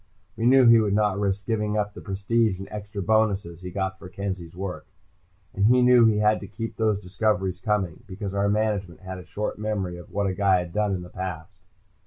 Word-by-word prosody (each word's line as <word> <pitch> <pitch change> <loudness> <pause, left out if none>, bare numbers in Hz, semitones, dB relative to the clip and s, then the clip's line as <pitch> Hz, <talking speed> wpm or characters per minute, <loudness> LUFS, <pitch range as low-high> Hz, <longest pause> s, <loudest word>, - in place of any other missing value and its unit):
We 115 - 0
knew 130 0 +6
he 115 -1 +8
would 105 -2 +1
not 105 -2 +1
risk 100 -1 -1
giving 105 -2 -1
up 105 -1 -1
the - - -10
prestige 100 +1 0
and 95 - -8
extra 105 -1 -5
bonuses 100 -5 +1
he 90 - -6
got 95 0 -3
for 90 - -10
Kenzie's 95 -3 -5
work. 95 0 -5 0.7
And 100 +1 +2
he 125 +1 +5
knew 125 -1 +6
he 110 -2 +3
had 105 +1 +3
to 100 - -8
keep 110 +3 -6
those 110 -3 +1
discoveries 95 -1 0
coming, 105 -3 -1
because 100 0 -5
our 100 0 +1
management 105 -4 -1
has 95 0 -7
a 90 - -11
short 105 +3 -4
memory 100 -5 -2
of 85 - -12
what 100 0 -1
a 95 - 0
guy 95 0 +3
has 85 - -10
done 105 +1 0
in 90 - -5
the 90 - -10
past. 90 0 -7
100 Hz, 220 wpm, -25 LUFS, 95-105 Hz, 0.7 s, he